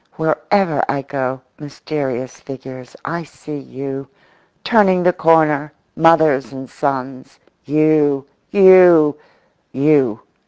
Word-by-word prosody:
Wherever 160 +1 0
I 140 0 -2
go, 130 -2 -4 0.2
mysterious 140 -3 -6
figures, 130 -2 -11
I 170 +2 -4
see 150 -1 -10
you, 135 0 -8 0.6
turning 190 -6 +2
the 180 0 +3
corner, 155 -3 +2 0.2
mothers 160 -5 +3
and 135 -1 -9
sons; 135 -2 -5 0.3
you, 150 -2 +1 0.2
you, 180 -6 +6 0.6
you. 135 -5 +1
145 Hz, 95 wpm, -17 LUFS, 135-160 Hz, 0.6 s, you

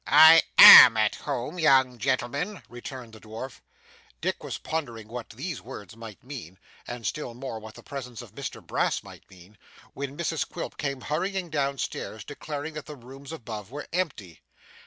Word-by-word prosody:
'I 160 +1 +8 0.2
AM 115 -3 +12
at 110 -1 +2
home, 145 +4 -5
young 130 -5 +3
gentleman,' 140 - -2
returned 120 0 -10
the 110 - -12
dwarf. 110 +5 -9 0.6
Dick - - -3
was - - -5
pondering 120 -9 -5
what 120 +1 -8
these 135 +6 -6
words 110 -5 -11
might 115 -3 -11
mean, 120 - -9 0.3
and 120 -2 -7
still 135 -6 -4
more 125 -3 -6
what 110 0 -12
the - - -14
presence 125 -5 -8
of - - -16
Mr - - -8
Brass - - -1
might - - -15
mean, 95 +2 -18 0.3
when 140 +1 -6
Mrs 165 -2 -2
Quilp - - -7
came 140 -3 -4
hurrying 180 +4 -3
down 140 -2 -1
stairs, 110 -3 -5
declaring 145 +1 -7
that 155 -1 -8
the 150 - -8
rooms 135 +2 -12
above 110 -9 -8
were 145 +3 -7
empty. 135 - -4
130 Hz, 170 wpm, -26 LUFS, 115-150 Hz, 0.6 s, AM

